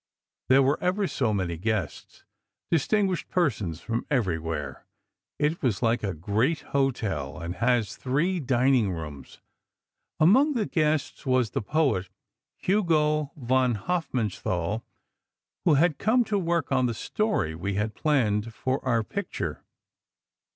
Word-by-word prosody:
There 135 +1 +6
were 140 +2 +1
ever 185 +3 +1
so 125 -9 0
many 90 -5 -1
guests, 100 -3 -3 0.5
distinguished 190 +3 +1
persons 105 - 0
from 115 +4 -3
everywhere. 80 - -2 0.5
It 150 +3 0
is 125 -3 0
like 115 +1 +2
a 100 -4 -2
great 110 - 0
hotel, 110 - -1
and 85 +1 -5
has 115 -1 +1
three 165 +8 0
dining 130 - +2
rooms. 75 -4 -8 0.8
Among 260 - +5
the 230 -5 0
guests, 155 -5 -1
was 130 -4 +2
the - - -1
poet 110 - 0 0.5
Hugo 155 -7 +1
von 130 -2 +1
Hofmannsthal, 110 - -2 0.8
who 160 - +5
had 155 +1 +2
come 240 +4 +3
to 210 -3 -1
work 170 -5 -1
on 130 -2 +3
the 120 - -2
story 210 - -1
we 95 +5 -3
had 105 +2 -1
planned 115 -7 0
for 130 +2 -2
our 120 -4 +1
picture. 105 - -4
130 Hz, 130 wpm, -26 LUFS, 105-155 Hz, 0.8 s, There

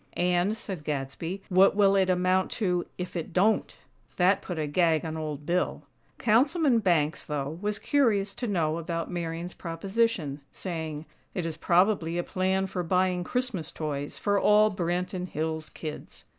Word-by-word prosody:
"And," 180 +4 +2
said 190 -7 -6
Gadsby, 150 +6 -4
"what 190 +1 +5
will 200 -1 +5
it 190 -1 +3
amount 185 +1 +2
to, 180 -5 0
if 180 0 -5
it 165 -1 -4
don't?" 210 +5 +2 0.4
That 190 +2 +4
put 180 - -5
a 155 - 0
gag 160 +1 +2
on 160 0 -4
Old 150 -2 -5
Bill. 175 +3 0 0.3
Councilman 265 +3 +3
Banks, 165 -7 +1
though, 150 +2 -4
was 210 0 -1
curious 210 -9 +2
to 240 +3 -4
know 165 -5 0
about 165 +1 -3
Marian's 170 0 -4
proposition, 175 -3 -1
saying: 160 -4 -5 0.3
"It 180 - -2
is 165 -2 -3
probably 175 0 +2
a 175 - 0
plan 190 +1 0
for 185 -1 -3
buying 180 +1 +1
Christmas 205 - -2
toys 145 -3 -4
for 205 -1 +1
all 210 +1 +5
Branton 180 0 -2
Hills 160 -1 -3
kids." 155 -2 -7
180 Hz, 155 wpm, -28 LUFS, 160-195 Hz, 0.4 s, what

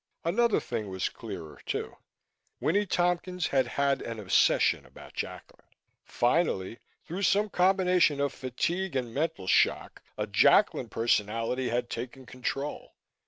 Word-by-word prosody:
Another 220 +7 +2
thing 105 -2 -4
was 95 0 -2
clearer, 95 -9 -9
too. - - -4 0.6
Winnie 200 +6 +1
Tompkins 180 0 0
had 135 -2 +2
had 140 -1 +2
an 115 -1 -5
obsession 95 -3 +3
about - - -14
Jacklin. - - -7 0.4
Finally, 120 - 0 0.3
through 175 +5 -5
some 205 +2 +3
combination 180 -5 +3
of 140 -1 0
fatigue 170 +8 -2
and 120 -3 -2
mental 145 - -2
shock, - - +2 0.2
a - - -1
Jacklin - - +4
personality 115 +3 0
had 120 +1 -1
taken 125 +3 -6
control. 130 +3 -5
135 Hz, 125 wpm, -29 LUFS, 115-180 Hz, 0.6 s, Jacklin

